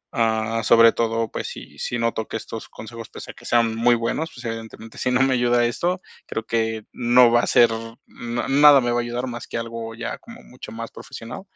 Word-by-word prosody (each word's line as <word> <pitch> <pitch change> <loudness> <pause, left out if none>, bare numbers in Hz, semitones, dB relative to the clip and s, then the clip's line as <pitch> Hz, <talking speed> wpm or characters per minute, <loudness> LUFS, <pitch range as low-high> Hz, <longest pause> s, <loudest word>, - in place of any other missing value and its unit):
ah, 115 -1 +1
sobre 115 +1 +7
todo, 115 -1 -1
pues - - -4
si - - -10
si 120 - -2
noto 115 -1 -1
que - - -4
estos 115 0 -8
consejos, 115 +1 -10
pues, - - -9
a - - -7
que - - -16
sean 115 -1 +2
muy 120 +1 +4
buenos, 120 +8 -2
pues 120 0 -11
evidentemente, 115 0 -7
si 125 - 0
no 125 +1 +3
me 135 -1 +2
ayuda 120 -1 +2
esto, 175 +10 -1 0.3
creo 115 - -4
que 110 -1 -1
no 120 0 +5
va 120 - +5
a - - -2
ser, 120 -2 +5 0.3
na 120 0 -5
nada 145 +1 +7
me 120 -2 0
va 120 - +1
a - - +1
ayudar 120 +1 -3
más 120 -2 -7
que - - -4
algo 115 -1 -5
ya 120 0 -5
como 230 0 -13
mucho 125 -3 -11
más 115 0 -7
profesional, 115 +1 -9
115 Hz, 225 wpm, -22 LUFS, 115-120 Hz, 0.3 s, sobre